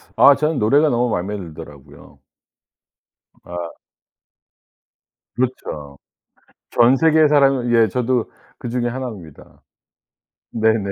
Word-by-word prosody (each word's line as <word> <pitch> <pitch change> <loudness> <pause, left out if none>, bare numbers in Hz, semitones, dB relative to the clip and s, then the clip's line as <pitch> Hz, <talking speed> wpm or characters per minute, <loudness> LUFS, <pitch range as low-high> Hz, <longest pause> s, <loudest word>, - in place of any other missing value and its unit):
아 140 - +6
전 150 +1 -1
노래가 140 +9 +3
너무 120 -1 0
맘에 100 +2 -3
들더라고요. 75 -5 -13 1.2
아. 85 -1 -7 1.6
그렇죠. 75 - -4 0.7
전 120 +3 +4
세계의 160 0 +4
사람이 135 -4 +2
예 115 -1 +4
저도 125 +2 -1 0.3
그중에 120 0 -3
1 130 +1 -5
입니다. 85 -9 -13 0.9
네네. 110 -3 0
115 Hz, 200 characters per minute, -19 LUFS, 90-130 Hz, 1.6 s, 아